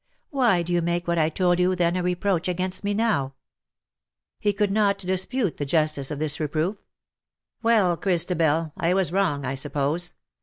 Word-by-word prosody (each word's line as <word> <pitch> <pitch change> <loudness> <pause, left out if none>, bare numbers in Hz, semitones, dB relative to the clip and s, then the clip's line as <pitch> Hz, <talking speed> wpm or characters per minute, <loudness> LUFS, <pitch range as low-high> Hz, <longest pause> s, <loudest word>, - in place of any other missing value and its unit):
Why 240 - +2
do 175 +1 -3
you 175 - +2
make 175 +1 -1
what 170 -1 +1
I 155 0 +3
told 175 +1 +1
you 180 +1 +2
then 175 -1 +1
a 180 - 0
reproach 180 0 0
against 185 +1 -1
me 205 0 0
now 145 -12 0 0.5
?" - - -66
He 205 - +2
could 205 0 0
not 200 -1 +2
dispute 190 +3 -2
the - - -2
justice 150 -2 0
of 150 - -4
this 150 0 -1
re 155 - 0
proof. 160 +7 -1
'^ - - -38 0.8
Well, 215 -7 +3
Christabel, 165 -4 +1
I 170 +2 +1
was 190 -3 +1
wrong, 170 -8 0
I 125 - -2
suppose. 145 +5 -2
175 Hz, 190 wpm, -24 LUFS, 155-195 Hz, 0.8 s, I